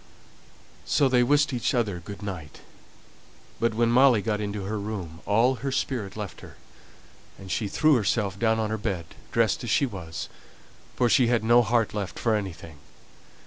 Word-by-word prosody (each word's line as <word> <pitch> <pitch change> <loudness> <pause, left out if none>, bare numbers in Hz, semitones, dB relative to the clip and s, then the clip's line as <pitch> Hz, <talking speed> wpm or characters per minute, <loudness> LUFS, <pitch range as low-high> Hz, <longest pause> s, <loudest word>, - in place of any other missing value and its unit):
So 140 - +2
they 125 -1 +3
wished 145 +3 +3
each 125 +1 0
other 105 -7 0
good 100 +4 -9
night. 90 -7 -7 1.0
But 115 -1 0
when 115 0 +2
Molly 125 -4 +5
got 105 0 -1
into 105 -1 -4
her 105 +2 -3
room 95 -6 -6
all 120 +5 +3
her 135 0 -2
spirit 120 -6 -2
left 100 -5 -6
her; - - -12 0.8
and 95 -1 -9
she 110 - -1
threw 155 +9 +3
herself 105 -4 0
down 110 -1 +2
on 110 -1 -1
her 110 - -2
bed, 95 -6 -3 0.3
dressed 115 +1 +1
as 120 - -4
she 140 - +3
was, 90 -9 -6 0.7
for 125 - +2
she 120 +2 +4
had 115 -2 +1
no 120 +2 +5
heart 115 -1 +1
left 100 -3 -4
for 115 - +1
anything. 85 -7 -5
110 Hz, 175 wpm, -26 LUFS, 100-120 Hz, 1.0 s, Molly